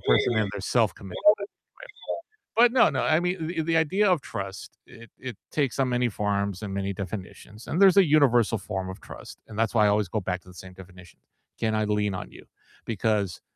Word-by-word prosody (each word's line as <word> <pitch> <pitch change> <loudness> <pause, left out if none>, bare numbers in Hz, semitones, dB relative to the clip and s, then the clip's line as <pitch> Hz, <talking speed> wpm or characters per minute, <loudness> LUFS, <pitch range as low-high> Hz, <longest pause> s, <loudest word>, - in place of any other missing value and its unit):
person 90 - +2
in 110 -2 +1
there 100 - -5
self-committed 100 -3 -1 0.2
anyway, 200 - -5 1.1
but 235 +1 +6
no, 250 -2 +5
no, - - -1
I 155 0 +3
mean, 180 -2 -2
the 165 0 -2
the 165 +1 +1
idea 190 +6 +2
of 175 -6 +2
trust, 95 -1 -7 0.2
it 115 -1 -14
it 130 -5 -7
takes 140 -5 -1
on 130 -2 +1
many 125 -1 +1
forms 100 -1 -2
and 100 -1 -5
many 100 0 -2
definitions, 100 +3 -8
and 165 - -2
there's 195 -1 +6
a 195 - +8
universal 125 -7 +4
form 95 -1 -5
of 95 +2 -8
trust, - - -11
and 110 0 -8
that's 115 +1 0
why 105 -2 +5
I - - +4
always 105 -1 +1
go 105 +5 -2
back 90 -1 -3
to - - -26
the 90 - -14
same 95 0 -11
definition. 90 -1 -15 0.4
Can 110 -1 0
I 110 0 +1
lean 105 -2 0
on - - -7
you? - - -14 0.4
Because 105 -5 -1
110 Hz, 215 wpm, -26 LUFS, 95-140 Hz, 1.1 s, a